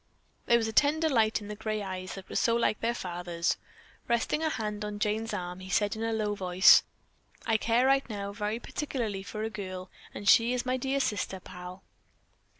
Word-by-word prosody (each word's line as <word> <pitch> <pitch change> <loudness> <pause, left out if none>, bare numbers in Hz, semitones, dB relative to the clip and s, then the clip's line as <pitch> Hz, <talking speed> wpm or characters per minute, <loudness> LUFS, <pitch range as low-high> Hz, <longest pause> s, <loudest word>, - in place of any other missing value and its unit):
There 235 - +6
was 225 -1 0
a 220 - -4
tender 305 +6 +3
light 225 -6 +2
in 205 - -8
the 210 - -5
gray 215 0 -3
eyes 185 -1 -5
that 195 -1 -10
were - - -8
so 230 - +3
like 235 -2 +1
their 235 +1 0
father's. 175 -3 -2 0.5
Resting 235 +5 +1
a 320 - +1
hand 210 -6 -3
on 210 0 -4
Jane's 215 +1 -1
arm, 180 0 -4
he 185 0 -9
said 205 +2 +1
in 220 - -6
a 225 0 0
low 215 -2 0
voice, 185 -1 +6 0.6
"I 225 -1 +3
care 235 +3 +2
right 270 -1 +3
now 200 -2 -4
very 210 +1 -2
particularly 235 -6 -3
for 215 +2 -5
a 220 - -3
girl, 185 -3 -6 0.2
and 205 - -7
she 230 +4 +6
is 250 0 -1
my 255 0 +1
dear 270 +2 -1
sister 205 -6 -1
pal." 180 +1 -10
215 Hz, 205 wpm, -29 LUFS, 195-235 Hz, 0.6 s, There